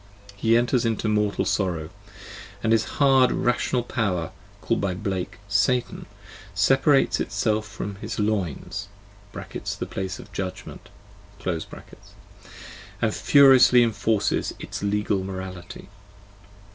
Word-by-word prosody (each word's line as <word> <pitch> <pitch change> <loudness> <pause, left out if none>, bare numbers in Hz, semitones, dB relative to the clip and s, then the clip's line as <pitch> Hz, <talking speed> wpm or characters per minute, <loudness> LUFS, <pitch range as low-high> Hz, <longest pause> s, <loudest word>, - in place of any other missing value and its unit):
He 115 +3 +3
enters 120 0 +1
into 115 -1 -1
mortal 105 -1 +1
sorrow, 85 -5 -1 0.7
and 110 - +1
his 115 -1 +3
hard 135 -3 +5
rational 120 0 0
power, 95 -9 -2 0.3
called - - -1
by 95 -2 -1
Blake 95 -1 -4
" - - -25
Satan," 105 +5 0 0.5
separates 135 +1 +3
itself 110 -1 -1
from 100 -1 -6
his 110 +2 -6
loins 100 -2 -2 0.4
(the - - -6
place 95 0 -4
of - - -13
judgment), 95 -1 -6 0.6
and 85 -3 -7
furiously 130 -3 +6
enforces 110 -2 0
its - - -6
legal 100 -1 0
morality. 95 -2 -7
105 Hz, 105 wpm, -24 LUFS, 95-120 Hz, 0.7 s, furiously